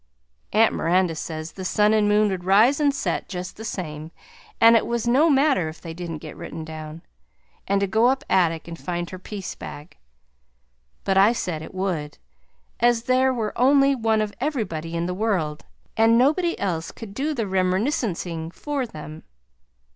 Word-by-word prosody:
Aunt 220 +2 +4
Miranda 175 +1 +1
says 155 0 -6
the 190 - -8
sun 210 +3 +3
and 210 -1 +3
moon 210 0 +4
would 185 -2 -3
rise 215 +10 +4
and 290 -1 +3
set 275 - -3
just 180 0 -6
the 220 - -9
same, 155 -7 -5 0.5
and 230 0 +7
it 225 - +2
was 235 -1 -2
no 275 +7 +4
matter 275 - +3
if 155 - -11
they 165 -2 -8
didn't 170 -1 -6
get 155 - -8
written 165 -1 -7
down, 155 +1 -8 0.6
and 200 0 +1
to - - +3
go 220 +5 +3
up 265 +2 +1
attic 165 -3 +1
and 165 -1 -8
find 175 -1 -4
her 185 - -7
piece 195 0 -6
bag; 145 - -10 1.1
but 195 -1 +2
I 205 +4 +6
said 175 -9 -3
it 160 - -10
would, 175 -6 -3 0.6
as 240 -1 +3
there 255 +2 +3
was 225 -4 -2
only 275 +2 +4
one 225 -4 +1
of 210 -1 -5
everybody 185 - -2
in 170 0 -1
the 180 - -2
world, 180 -7 -1 0.3
and 225 +1 +5
nobody 315 +7 +2
else 165 -4 -2
could 220 -4 -10
do 295 +7 -2
their 230 -4 -1
remerniscensing 185 - -1
for 285 -4 -3
them. 155 -4 -9
195 Hz, 175 wpm, -23 LUFS, 170-235 Hz, 1.1 s, and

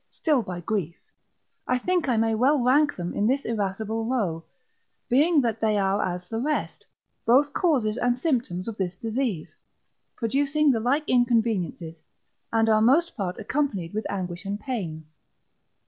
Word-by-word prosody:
still 300 -6 +1
by 185 -4 -6
grief, 175 -3 -2 0.7
I 250 - +2
think 350 +1 0
I 240 - +2
may 225 0 +2
well 260 +7 +3
rank 285 +4 +3
them 175 -1 -4
in 205 - +1
this 270 +3 0
irascible 220 +1 -2
row; 205 -10 -1 0.7
being 295 +5 +4
that 230 -3 -2
they 215 -1 +2
are 195 +1 +1
as 180 0 -4
the 225 - -3
rest, 300 +5 -2 0.4
both 275 +5 +4
causes 250 - +1
and 245 -1 +1
symptoms 240 - -1
of 225 -2 -5
this 185 -2 -2
disease, 225 - -3 0.6
producing 280 +5 +2
the 230 - 0
like 275 +7 0
inconveniences, 220 -9 0 0.5
and 225 0 +2
are 215 -1 +4
most 300 +10 +3
part 185 -5 -3
accompanied 210 - -2
with 215 +1 -3
anguish 180 -2 -4
and 200 +1 -4
pain. 180 - -5
225 Hz, 155 wpm, -25 LUFS, 195-265 Hz, 0.7 s, being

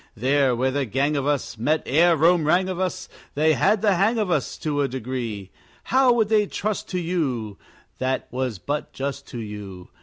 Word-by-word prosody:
There 135 +2 +2
where 130 +2 0
the 140 0 -1
gang 140 +6 0
of 140 -1 -1
us 145 -5 -1
Met 155 +7 +1
ere 165 +5 +4
Rome 165 +2 +4
rang 180 +4 +3
of 185 -1 -4
us, 185 -1 -2 0.3
They 155 +2 +3
had 215 +6 +2
the 205 -2 +4
hang 215 +6 +2
of 210 -5 0
us 150 -6 -1
To 145 -2 -1
a 140 - +1
degree. 120 -6 -5 0.3
How 250 -3 +4
they 215 0 +2
would 210 - -2
trust 215 0 -3
to 180 - -2
you! 135 - -2 0.4
That 130 0 -1
was 125 -4 -2
but 145 - -4
just 140 0 -4
to 125 - -8
you. 105 -5 -8
145 Hz, 195 wpm, -23 LUFS, 125-180 Hz, 0.4 s, ere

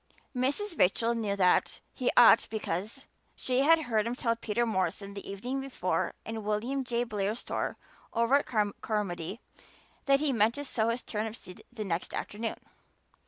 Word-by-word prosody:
Mrs. 290 +9 -1
Rachel 225 +6 +3
knew 215 -4 -1
that 180 -2 +3
he 255 - 0
ought 235 -1 +8
because 215 +4 -4 0.3
she 255 0 0
had 320 +3 +5
heard 225 -4 +1
him 240 - -2
tell 230 -2 0
Peter 230 +1 -1
Morrison 200 -1 -1
the 200 - -8
evening 245 +8 -3
before 270 -1 -1
in 225 -1 -5
William 230 +6 -1
J. 240 -1 0
Blair's 210 -1 -2
store - - -3 0.3
over 235 +2 +1
at - - -7 0.3
Carmody 195 -2 -3 0.6
that 275 0 +4
he 290 -2 +1
meant 225 0 +3
to 285 0 -5
sow 225 -4 0
his 235 +2 -2
turnip 215 0 -3
seed 185 -5 -12
the 220 -3 -5
next 170 -2 -2
afternoon. 225 +2 -3
230 Hz, 165 wpm, -30 LUFS, 210-250 Hz, 0.6 s, ought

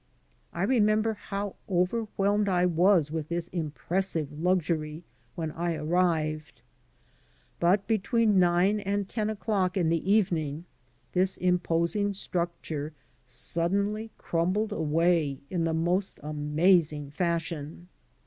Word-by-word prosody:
I 170 - -3
remember 215 -1 +3
how 200 0 -5
overwhelmed 200 +2 +1
I 180 -1 +3
was 175 -2 +3
with 155 -1 -4
this 170 0 -2
impressive 165 0 -2
luxury 165 -3 0 0.3
when 160 -3 -3
I 170 +1 -2
arrived. 155 -1 -1 1.0
But 190 +4 +3
between 220 -1 +2
nine 180 +4 +3
and 200 0 -2
ten 215 +1 -2
o'clock 200 -4 -1
in 170 -4 +2
the 165 +4 0
evening 170 -7 +1 0.5
this 185 +1 +1
imposing 180 +3 +1
structure 170 -5 -4 0.3
suddenly 200 - -1
crumbled' 185 +6 0
away 160 -4 +1
in 170 -3 0
the 165 - +1
most 180 +4 0
amazing 150 0 +2
fashion. 170 0 -3
175 Hz, 110 wpm, -28 LUFS, 160-200 Hz, 1.0 s, remember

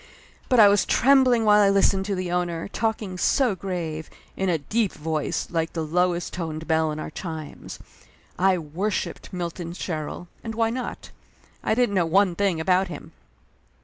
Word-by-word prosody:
But 250 -3 +4
I 210 - +9
was 200 0 +4
trembling 255 -3 +4
while 210 0 +6
I 200 - +5
listened 195 -1 +3
to 200 -1 -1
the 185 -1 -3
owner, 175 -2 -1
talking 210 -4 -2
so 255 +1 +3
grave, 170 -5 -4 0.3
in 190 -1 -1
a 170 - +2
deep 210 +8 -1
voice 155 -1 -2
like 165 -1 -1
the 165 - -2
lowest 175 +2 0
toned 160 -2 -5
bell 160 -1 +2
in 150 - -5
our 155 - -6
chimes. 160 -3 -7 0.6
I 190 0 +4
wor 170 +6 -3
shiped - - -4
Milton 170 -1 -5
Sherrill, 165 -1 -5 0.2
and 225 -1 -5
why 225 0 +1
not? 250 +1 -5 0.5
I - - +1
didn't 245 -4 +2
know 180 -4 +2
one 190 +2 +3
thing 190 -2 0
about 185 +3 +2
him. 175 - -9
180 Hz, 175 wpm, -24 LUFS, 165-205 Hz, 0.6 s, I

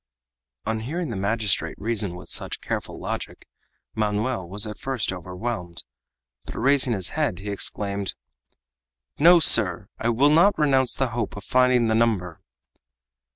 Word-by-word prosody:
On 110 0 -1
hearing 155 +6 -4
the - - -4
magistrate 100 +1 0
reason 105 -4 -2
with 90 - -11
such - - -2
careful - - -5
logic, - - -6 0.5
Manoel 105 -2 -1
was 100 +3 -1
at 105 -1 -7
first 125 -9 -1
overwhelmed, 90 -1 -5 0.6
but, - - -8
raising 135 0 +3
his 95 -4 0
head, 90 - -1
he 100 +2 -6
exclaimed: 100 0 -2 1.0
"No, 170 +3 +7
sir, 100 - +4
I 115 - 0
will 135 +5 +3
not 175 +7 +5
renounce 135 -4 +2
the 135 -2 0
hope 115 -3 -4
of 100 - -8
finding 125 +1 +3
the 110 - +1
number!" 105 -7 0
110 Hz, 145 wpm, -24 LUFS, 100-130 Hz, 1.0 s, No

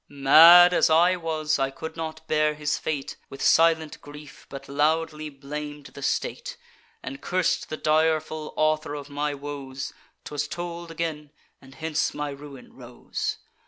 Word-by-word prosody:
Mad 165 +6 +8
as - - +3
I 170 +3 +4
was, 155 -3 -1
I 135 - +1
could 160 +4 -8
not 160 -1 -6
bear 155 0 +1
his 150 -1 -1
fate 145 -3 -4
With 135 - -10
silent 160 -1 +3
grief, 145 0 -13
but 135 0 -9
loudly 155 +2 0
blam'd 145 +1 -7
the 140 - -10
state, - - -3 0.5
And 275 - -7
curs'd 185 -1 -1
the 155 - -4
direful 155 0 0
author 155 -1 0
of 145 0 -8
my 145 0 -2
woes. 140 -1 -7 0.3
'Twas 150 0 -3
told 170 +1 -6
again; 160 -3 -4 0.3
and 135 0 -16
hence 160 -1 -2
my 150 -1 -3
ruin 140 -1 -12
rose. - - -5
155 Hz, 150 wpm, -25 LUFS, 145-160 Hz, 0.5 s, Mad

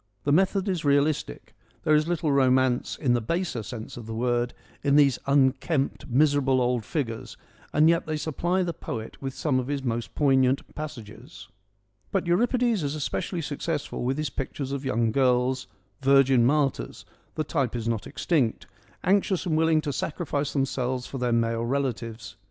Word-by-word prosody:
The 145 - +1
method 190 +4 +2
is 185 -4 -1
realistic: 145 - 0 0.3
there 155 - +3
is 150 +1 +3
little 170 -3 0
romance, 130 -2 +2
in 130 -5 +1
the 120 - +1
baser 165 0 -2
sense 110 +1 -8
of 115 -2 -8
the 110 - -5
word, 120 +1 0 0.3
in 140 0 +2
these 140 -4 +5
unkempt, 140 +1 +1
miserable, 135 0 +3
old 125 -2 +1
figures, 115 -4 -4 0.3
and 155 +2 +4
yet 170 0 +2
they 155 -1 -1
supply 175 +5 0
the 170 -1 -2
poet 115 -7 -7
with 135 -1 -4
some 135 -5 +1
of 125 - -3
his 140 -1 -2
most 120 -2 -3
poignant 135 -2 +2
passages. 120 -9 -9 0.6
But 190 -2 0
Euripides 235 +4 +2
is 145 0 -2
especially 165 +4 -3
successful 150 -1 -3
with 130 +3 0
his 155 -1 -2
pictures 135 0 -4
of 140 0 -3
young 115 -3 +1
girls, 130 0 +2 0.3
virgin 135 -3 +5
martyrs 140 - 0
— - - -37
the 155 - 0
type 140 -6 -1
is 115 -1 -3
not 115 -3 -2
extinct 135 -10 0 0.2
— - - -31
anxious 190 0 +2
and 165 -3 0
willing 160 0 +3
to 145 -2 -3
sacrifice 145 -1 -2
them 135 -2 +2
selves 125 -1 -2
for 135 - -6
their 125 -1 0
male 115 0 +1
relatives. 115 -4 -3
135 Hz, 175 wpm, -26 LUFS, 125-155 Hz, 0.6 s, these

